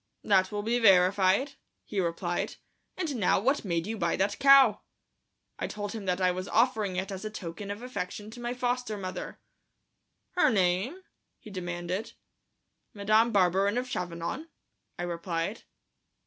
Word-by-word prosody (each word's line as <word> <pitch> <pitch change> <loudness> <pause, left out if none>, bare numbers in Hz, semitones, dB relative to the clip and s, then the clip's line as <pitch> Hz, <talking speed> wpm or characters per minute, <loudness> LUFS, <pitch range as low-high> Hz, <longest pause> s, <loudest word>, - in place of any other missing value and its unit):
"That 190 -2 +3
will 205 0 -3
be 235 +3 +1
verified," 195 +5 +4 0.3
he 205 - -3
replied. 175 0 -2 0.4
"And 320 -8 -2
now 195 -4 +3
what 270 +8 +1
made 170 -4 -1
you 220 +1 -4
buy 170 -2 +1
that 205 +2 0
cow?" 275 -5 +7 0.8
I - - -2
told 205 -1 -5
him 215 -2 -6
that 180 0 +1
I 185 -1 +3
was 185 +1 -4
offering 220 -5 +2
it 190 +2 -3
as 190 0 -6
a 215 - -3
token 200 -1 -7
of 205 +4 -5
affection 210 -3 -5
to 245 - -10
my 240 +1 -3
foster 245 -3 -1
mother. 185 -2 -6 0.9
"Her 360 - +3
name?" 200 - +1 0.3
he 215 - -13
demanded. 180 +2 -4 0.8
"Madame 215 +3 +3
Barberin 195 +2 +3
of 250 +1 -1
Chavanon," 180 - -4 0.5
I 175 - -3
replied. 170 +3 -3
200 Hz, 150 wpm, -29 LUFS, 180-230 Hz, 0.9 s, cow